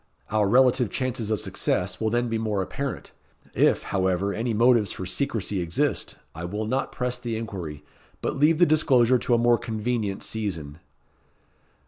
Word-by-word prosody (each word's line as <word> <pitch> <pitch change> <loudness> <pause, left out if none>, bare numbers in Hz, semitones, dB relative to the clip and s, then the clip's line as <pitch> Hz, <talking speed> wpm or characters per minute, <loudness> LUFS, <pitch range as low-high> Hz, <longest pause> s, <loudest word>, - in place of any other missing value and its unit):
Our 105 -2 +2
relative 125 0 +4
chances 125 -1 -2
of 110 -2 0
success 90 +3 -1
will 110 - +1
then 120 +2 0
be 115 -1 -1
more 105 -3 -1
apparent. 140 +6 -5 0.4
If, - - +3
however, 95 +1 0
any 115 +2 -2
motives 115 -2 +3
for 95 - -5
secrecy 105 -3 -1
exist, 85 -1 -1 0.2
I 80 - -7
will 105 +5 -3
not 130 +5 -1
press 125 0 -2
the 120 -2 -3
inquiry, 85 -10 -6 0.3
but - - -2
leave 155 +2 +4
the 175 - +6
disclosure 130 -6 +4
to 120 - +1
a - - +3
more 120 0 +3
convenient 110 -3 -2
season." 85 -9 -4
110 Hz, 160 wpm, -25 LUFS, 100-125 Hz, 0.4 s, the